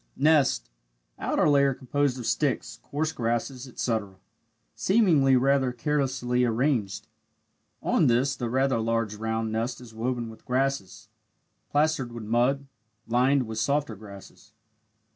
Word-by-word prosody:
Nest 140 - +3 0.5
outer - - +1
layer 140 -2 +4
composed 140 0 -1
of 125 - -6
sticks, 130 +2 -1
coarse 155 +2 -2
grasses, 120 +2 -2
etc., 110 -5 -2 0.6
seemingly 165 - +4
rather 135 0 +3
carelessly 125 -2 0
arranged 115 -4 0 0.8
on - - +3
this 130 +3 +2
the 120 -3 -3
rather 130 0 +1
large 115 -1 0
round 110 +1 -2
nest 115 +2 -2
is 120 -3 -13
woven 120 0 -3
with 110 - -15
grasses 125 -7 -2 0.6
plastered 145 -4 +1
with 120 -2 -7
mud 120 +5 +1 0.4
lined 125 +3 +3
with 110 0 -5
softer 140 -1 0
grasses. 105 +1 -13
125 Hz, 125 wpm, -26 LUFS, 115-140 Hz, 0.8 s, layer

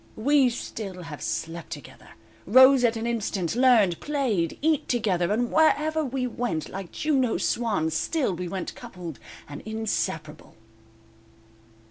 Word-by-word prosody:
_"We 270 +3 +4
still 200 -6 -6
have 155 -3 -8
slept 165 0 -4
together, 145 -4 -10 0.4
Rose 260 +4 +7
at 230 -1 +2
an 225 - -3
instant, 210 -6 -2
learned, 235 -9 +4
played, 245 - -1
eat 315 -2 +2
together, 195 -7 0
And 240 +3 0
wherever 315 0 +3
we 260 -2 -2
went 235 -10 -3
like 195 -2 -7
Juno's 270 -6 0
swans, 205 -10 0
Still 260 - 0
we 180 +1 -4
went 185 0 -4
coupled, 180 - -9 0.3
and 145 - -8
inseparable." 200 -8 -4
220 Hz, 130 wpm, -26 LUFS, 175-255 Hz, 0.4 s, Rose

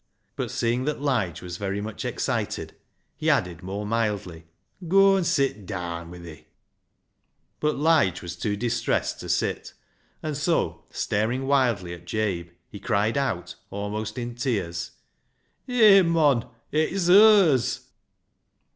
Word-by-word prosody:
" - - -47
But - - -3
seeing 120 +2 -1
that 150 - -2
Lige 120 - -1
was 90 -1 -6
very 100 0 -3
much 105 +1 -6
excited, - - -2 0.4
he - - -1
added 85 -2 +1
more 100 +3 -5
mildly 105 -7 -2
— 90 - -49
" 180 -2 -12
Goa 195 +2 +5
an' 190 - 0
sit 135 - 0
daan 85 -3 -5
wi' 90 - -10
thi," 85 -3 -12 1.1
But 150 0 0
Lige 145 - +2
was 85 0 -6
too 105 +3 -2
distressed 120 +3 -1
to - - -8
sit, - - -1 0.5
and 155 -2 -3
so, 160 +4 -1
staring 115 +6 -1
wildly 120 -10 +1
at 85 0 -11
Jabe, 95 -5 -2 0.2
he 100 - -10
cried 110 +1 0
out, 105 -11 -2 0.2
almost 105 +3 -4
in 120 -1 -4
tears 105 -9 -2 0.2
— - - -47
" - - -46
Hey, 215 -6 +7
mon, 155 -8 +2 0.2
it's 170 +4 0
hers." 180 - +6
115 Hz, 145 wpm, -25 LUFS, 95-150 Hz, 1.1 s, Hey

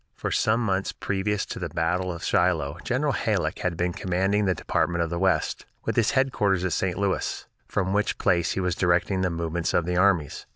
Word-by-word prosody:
For - - -4
some 110 +2 +2
months 95 -2 0
previous 95 +1 -1
to - - -6
the - - -3
battle 90 +3 0
of 85 -1 -7
Shiloh 80 -6 +1
General - - 0
Halleck - - -1
had 90 -2 -2
been 90 0 0
commanding 95 +4 0
the 95 -2 +2
Department 85 -1 0
of 85 - -4
the 85 - -2
West, 95 0 0 0.2
with - - -1
his 115 - +3
headquarters 100 -9 +2
at 90 - 0
St. 90 +1 -1
Louis, 100 -1 -1 0.2
from 95 0 -1
which 105 +2 0
place 85 -2 +2
he - - -2
was 90 -1 0
directing 90 +2 +1
the 90 - +1
movements 85 0 -2
of 85 - +2
the 90 0 -1
armies. 90 -6 +1
90 Hz, 205 wpm, -25 LUFS, 85-95 Hz, 0.2 s, his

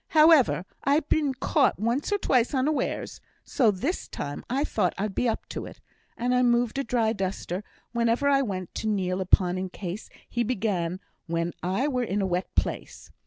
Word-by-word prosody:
However, 305 - +6 0.2
I'd 285 +2 +2
been 290 -4 +2
caught 275 +2 +2
once 235 - -1
or 410 - +3
twice 255 - +2
unawares, 285 +3 -1 0.2
so 240 -5 +3
this 255 - -2
time 145 0 -5
I 270 +4 +1
thought 220 - 0
I'd 200 +1 -2
be 245 - +1
up 225 - -3
to - - -5
it, - - -12 0.4
and 245 +1 0
I 250 - +4
moved 240 +1 +2
a - - 0
dry 230 -3 +1
duster 190 -1 -3 0.3
wherever 235 +3 +1
I 275 -1 +4
went, 185 -8 -4
to 220 - -2
kneel 190 -3 0
upon 185 -1 +3
in 185 0 -3
case 185 +2 -6 0.2
he 240 - -2
began 190 -6 -1 0.3
when 170 +1 -1
I 190 +10 0
were 255 -4 0
in 205 -3 -1
a 195 - +1
wet 180 0 -1
place. - - -3
230 Hz, 185 wpm, -26 LUFS, 190-260 Hz, 0.4 s, However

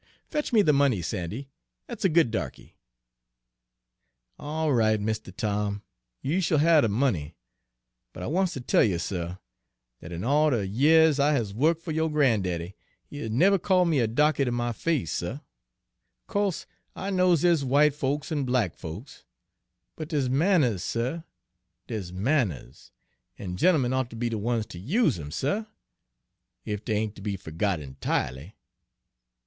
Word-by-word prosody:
Fetch 300 0 -3
me 220 -4 +5
the 150 - +4
money, 140 -7 +3
Sandy, 95 - -4 0.4
that's - - -7
a 190 - +4
good 160 -7 +3
darky!" 110 - -5 1.6
"All 155 0 -1
right, 110 -3 +3
Mistuh 110 -1 -3
Tom, 105 +1 -2 0.4
you 165 +8 0
shill 160 -3 +2
have 160 +1 +5
de 115 - +2
money; 100 - 0 0.8
but - - -8
I - - -3
wants 180 +4 0
ter 130 - -5
tell - - +3
you, 100 -6 +1
suh, 85 0 -4 0.6
dat 85 - -10
in 85 +1 -5
all 150 +4 +3
de 115 -8 0
yeahs 150 +8 +4
I 145 +2 +3
has 115 -8 -1
wo'ked 155 +8 +2
fer 165 - -4
yo' 160 +1 0
gran'daddy, 100 - 0 0.3
he 145 - -9
has 115 - -4
never 185 - +4
called 180 -1 +2
me 155 -4 +2
a 115 - +2
'darky' 150 +5 +2
ter 130 - 0
my 120 0 -1
face, 140 - -1
suh. 90 +10 -3 0.9
Co'se 200 -3 -1 0.3
I 195 +1 -4
knows 180 -4 +3
dere's 170 -4 +4
w'ite 140 +2 +3
folks 145 +3 -2
an' 145 -3 0
black 125 -8 0
folks, 85 - -9 0.7
but 155 - -6
dere's 140 -6 0
manners, 140 - +2
suh, 125 +8 -2 0.6
dere's 105 -7 -5
manners, 100 - -2 0.5
an' 90 -2 -5
gent'emen 130 - +3
oughter 130 -3 -2
be 120 +1 -1
de 115 - -2
ones 115 +1 -1
ter 85 - -10
use 160 - +1
'em, 75 -2 -7
suh, 145 - -1 1.0
ef 105 0 -4
dey 110 - -1
ain't 105 0 -2
ter - - -10
be 100 -1 -3
fergot 90 +2 -2
enti'ely!" 65 - -3
125 Hz, 160 wpm, -26 LUFS, 100-155 Hz, 1.6 s, me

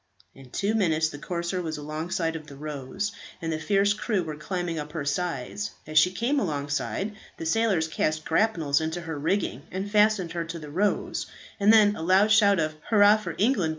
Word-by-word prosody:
In 135 -1 -15
two 200 - -1
minutes 160 -7 +2
the 145 - -9
corsair 175 +2 -3
was 160 -3 -4
alongside 160 +3 -3
of 155 -1 -7
the 140 - -11
"Rose," 150 +8 -4 0.3
and 165 -1 -3
the 155 - -2
fierce 200 +4 +2
crew 210 -2 -1
were 155 -2 -5
climbing 175 +1 -3
up 150 0 -7
her 155 -4 -3
sides. 175 - -2 0.2
As 155 0 +4
she 180 - +5
came 235 +10 0
alongside 150 - -2 0.2
the 165 - -6
sailors 190 -3 +2
cast 155 0 -1
grapnels 165 -10 +2
into 160 +2 -3
her 160 -3 -5
rigging, 160 -4 -1
and 190 +2 -4
fastened 210 -4 +3
her 170 -1 -2
to 165 +1 -6
the 150 -3 -9
"Rose;" 200 +6 0 0.3
and 205 +1 +5
then 210 -2 +6
aloud 190 +5 +3
shout 200 -3 +5
of 155 -1 0 0.2
"Hurrah 210 -1 +6
for 180 -6 -6
England!" 205 -6 +2
170 Hz, 190 wpm, -26 LUFS, 155-205 Hz, 0.3 s, then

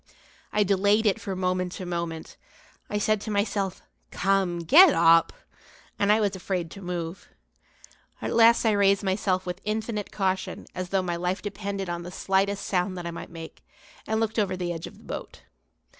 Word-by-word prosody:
I 210 - +3
delayed 200 +3 +2
it 205 - +2
from 190 -2 -4
moment 185 -1 -1
to 185 - -6
moment. 170 -2 -4 0.5
I 210 - -1
said 215 0 +1
to 215 - -6
myself: 200 -2 -1 0.3
"Come, 195 -2 +1
get 320 - +8
up!" 165 0 +5 0.7
and 200 0 +3
I 215 - +4
was 205 -3 0
afraid 180 -3 -3
to 195 - -10
move. 175 -1 -5 0.9
At - - -3
last 230 +1 +5
I 220 - +4
raised 200 -1 +3
myself 190 -1 0
with 180 +1 -5
infinite 215 0 -3
caution 190 -2 -2
as 185 -1 -5
though 195 -1 +1
my 175 -1 -2
life 180 +2 -2
depended 200 -1 -4
on 175 0 -3
the 175 - -7
slightest 195 +2 0
sound 185 0 -1
that 175 - -6
I 170 - -3
might 170 - -8
make; 165 -1 -10 0.4
and 220 0 0
looked 225 0 0
over 190 -3 0
the 175 -1 -2
edge 165 -1 -6
of - - -13
the - - -18
boat. - - -8
190 Hz, 185 wpm, -26 LUFS, 180-205 Hz, 0.9 s, get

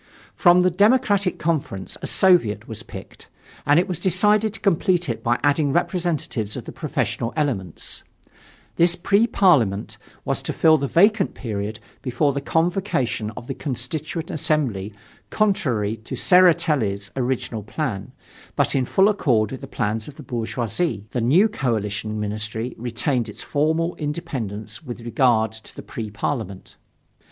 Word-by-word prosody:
From 175 0 +5
the 180 0 +3
Democratic 205 -1 +3
Conference 150 - -2
a - - -3
Soviet 175 - +3
was - - -7
picked, - - -11 0.4
and 145 +3 +6
it 180 - +1
was 180 -3 -3
decided 210 +4 +3
to - - -7
complete 180 -2 +1
it 115 - -3
by 120 +1 +1
adding 145 0 +2
representatives 165 - -1
of - - -7
the - - -7
professional 115 - -2
elements; 120 - -2 0.8
this 170 +1 +4
Pre 200 +6 +2
Parliament 125 - +2 0.3
was - - -1
to - - -3
fill 160 -1 +4
the 140 - -1
vacant 200 +6 +3
period 105 -2 -4 0.2
before 140 +3 0
the 140 - -2
convocation 160 - 0
of - - -7
the 135 - -4
Constituent 150 +5 -3
Assembly 140 - -1 0.4
Contrary 120 - 0
to 110 - -7
Tseretelli's 150 - +3
original 125 -3 -2
plan, 105 -3 -4 0.4
but - - +2
in 130 -2 +1
full 190 +9 +4
accord 120 - +2
with 130 - -7
the - - -7
plans 110 +1 -2
of 150 - -10
the 150 - -11
bourgeoisie, 115 - -2
the 125 - -1
new 160 - +5
coalition 110 - -2
ministry 110 +3 -3
retained 120 0 -1
its 105 - -8
formal 160 +4 0
independence 120 -8 -5
with 120 -4 -7
regard 115 -2 +2
to 110 0 -11
the - - -8
Pre 110 -2 -6
Parliament. 105 -3 -4
135 Hz, 145 wpm, -22 LUFS, 110-175 Hz, 0.8 s, and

